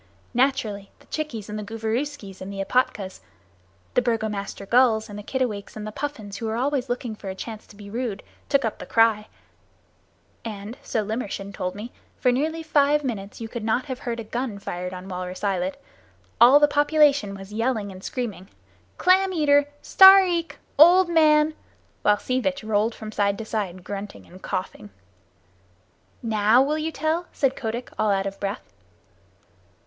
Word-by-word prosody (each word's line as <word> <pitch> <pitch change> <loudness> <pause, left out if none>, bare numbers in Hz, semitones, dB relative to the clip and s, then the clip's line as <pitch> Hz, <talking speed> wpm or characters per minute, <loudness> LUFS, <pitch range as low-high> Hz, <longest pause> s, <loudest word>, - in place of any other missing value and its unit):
Naturally 245 -6 0
the - - -22
Chickies 260 -10 -5
and 210 0 -5
the - - -5
Gooverooskies 225 0 -4
and 190 +1 -6
the 195 - -7
Epatkas 195 -2 0 0.7
the 250 - +3
Burgomaster 215 -4 -2
Gulls 235 -1 +3
and 205 0 -8
the - - -6
Kittiwakes 220 -3 -3
and 215 -1 -6
the 215 - -5
Puffins, 220 -6 -5
who 225 -2 -3
are 220 - -2
always 265 0 -1
looking 245 -2 -3
for 200 -2 -8
a 190 - -5
chance 220 +2 -8
to - - -16
be 205 0 -11
rude, 220 -2 -4 0.3
took 275 -3 +2
up 220 - -3
the 180 - -8
cry, 225 -2 +3 1.2
and 215 0 -6
so 215 -2 -2
Limmershin 200 -3 -4
told 185 -1 -4
me 220 +4 -7 0.3
for 250 - +3
nearly 315 +6 -1
five 295 -1 +3
minutes 205 -6 -5
you 225 - -5
could 230 0 -6
not 225 +3 0
have 260 -3 -5
heard 240 -4 -4
a - - -4
gun 235 0 -4
fired 180 -2 -5
on 185 0 -8
Walrus 180 0 -6
Islet. 190 -2 -1 0.6
All 255 +5 +9
the 295 - +6
population 290 -7 +3
was 195 +1 -10
yelling 225 -3 -1
and 185 0 -11
screaming 210 -6 -5 0.5
"Clam 375 +1 +4
eater! 290 -4 +3 0.2
Stareek 380 -3 +7 0.3
[old 350 +3 +7
man]!" 310 -2 +4 0.5
while 210 0 +4
Sea 255 +4 -1
Vitch 275 -1 -2
rolled 220 +1 +1
from 215 -1 -8
side 200 -1 +1
to 225 - -6
side 190 -5 -4
grunting 200 +1 -7
and 185 +2 -15
coughing. 145 - -5 1.3
"Now 220 +1 +4
will 300 +3 -1
you 320 +1 -2
tell?" 320 +3 -1
said 270 -2 0
Kotick, 235 +1 -4
all 215 - +2
out 195 -1 +1
of 195 0 -5
breath. 200 +1 -4
225 Hz, 170 wpm, -24 LUFS, 200-275 Hz, 1.3 s, All